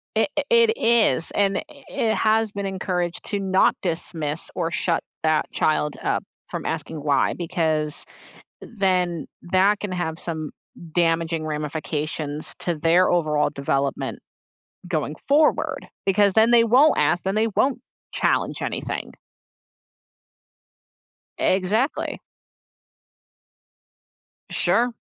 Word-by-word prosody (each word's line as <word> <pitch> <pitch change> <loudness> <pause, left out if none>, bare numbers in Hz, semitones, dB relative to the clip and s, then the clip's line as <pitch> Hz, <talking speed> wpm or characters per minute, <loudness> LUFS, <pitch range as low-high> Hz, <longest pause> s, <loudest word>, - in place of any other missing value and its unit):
It - - +2
i - - +2
it 465 -1 +5
is, 225 - +3
and 200 -1 +1
i - - -3 0.3
it 220 -1 0
has 220 -1 +2
been 200 -1 -4
encouraged 180 -2 -2
to 200 -1 -1
not 190 -1 +3
dismiss 160 -3 -2
or 170 -1 -1
shut 170 -1 0 0.2
that 155 -1 +1
child 150 -1 +1
up - - 0 0.3
from - - -5
asking, 160 - -3
"Why," 145 -2 +2
because 160 -4 -1 0.6
then 180 -6 -1 0.2
that 190 +3 +2
can 205 -3 -4
have 165 -2 -3
some 160 -3 -4 0.4
damaging 165 -2 +1
ramifications 150 0 -3
to 175 - -1
their 165 +4 +3
overall 155 -4 +2
development 140 0 -2 0.7
going 155 -3 -2
forward, 300 +2 +2 0.2
because 200 0 +3
then 225 +1 +5
they 235 -1 +7
won't 260 +7 +5
ask, 155 +5 +2
then 190 +1 0
they 220 +1 +2
won't 270 0 +2 0.3
challenge - - 0
anything. - - -4 2.2
Exactly. 205 +9 0 2.3
Sure. 245 +1 +2
175 Hz, 110 wpm, -23 LUFS, 155-205 Hz, 2.3 s, they